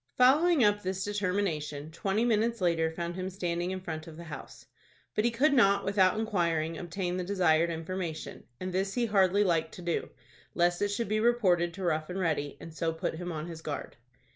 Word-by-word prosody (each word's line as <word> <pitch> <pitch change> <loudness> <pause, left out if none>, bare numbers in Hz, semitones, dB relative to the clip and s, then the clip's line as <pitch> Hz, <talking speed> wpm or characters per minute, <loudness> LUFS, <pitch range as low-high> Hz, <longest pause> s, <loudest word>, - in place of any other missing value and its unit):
Following 290 +4 +5
up 205 0 +3
this 190 0 -2
determination, 180 -7 -2
twenty 195 +6 0
minutes 230 0 +1
later 165 -3 +2
found 170 +1 -4
him 185 0 -3
standing 175 -2 -2
in 190 0 -3
front 160 -3 -6
of 160 -1 -10
the 170 - -8
house. 160 -3 -9 0.5
But 210 - +1
he - - +4
could 275 +6 +3
not, 200 -7 +4
without 195 0 +3
inquiring, 170 -7 0
obtain 175 +1 -3
the 180 - -2
desired 175 -3 +3
information, 165 0 -5
and 185 0 -4
this 195 +1 -1
he 245 -1 +2
hardly 200 -2 +3
liked 165 -4 0
to 180 - -9
do, 170 -1 -1 0.5
lest 175 0 +2
it 205 - +3
should 205 +3 -2
be 215 +2 +1
reported 195 -7 +3
to 190 - -6
Rough 155 -2 0
and 180 - -4
Ready, 155 -5 -1
and 165 - -10
so 165 0 -1
put 160 0 -3
him 175 +1 -4
on 155 -1 -4
his 165 -2 -8
guard. 145 -6 -5
180 Hz, 200 wpm, -30 LUFS, 165-205 Hz, 0.5 s, Following